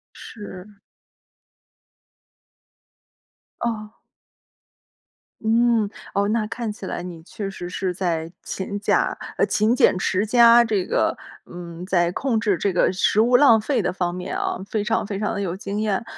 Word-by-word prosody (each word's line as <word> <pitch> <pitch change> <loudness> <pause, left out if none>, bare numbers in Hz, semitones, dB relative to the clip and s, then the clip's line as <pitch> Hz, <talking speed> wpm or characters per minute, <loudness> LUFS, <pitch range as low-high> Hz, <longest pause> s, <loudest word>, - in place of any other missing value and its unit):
是。 205 -2 -10 2.9
哦。 215 -2 -3 1.5
嗯， 225 -1 +2 0.2
哦， 200 +1 +1
那 215 -1 0
看 230 -1 -4
起 200 -2 -9
来 175 - -4
你 175 -2 -8
确 195 +1 -6
实 180 -2 -7
是 180 0 -2
在 170 -3 -2
勤 200 +1 -4
假 - - +1 0.2
呃， - - +3
勤 215 +3 +2
俭 185 - +4
持 190 +2 0
家， 235 +1 +7
这 210 -5 0
个， - - +1 0.3
嗯， 175 0 -9
在 175 -2 +1
控 250 -1 0
制 210 -4 +1
这 195 +3 0
个 180 - +2
食 195 +3 +2
物 245 +2 +5
浪 230 -5 +6
费 240 -1 0
的 - - -1
方 180 -1 -2
面 180 - -5
啊， - - -2
非 210 -2 -1
常 225 0 0
非 200 -1 -4
常 210 - -1
的 200 - -3
有 185 -2 -2
经 200 +1 -4
验。 215 +1 -1
205 Hz, 165 characters per minute, -22 LUFS, 185-225 Hz, 2.9 s, 家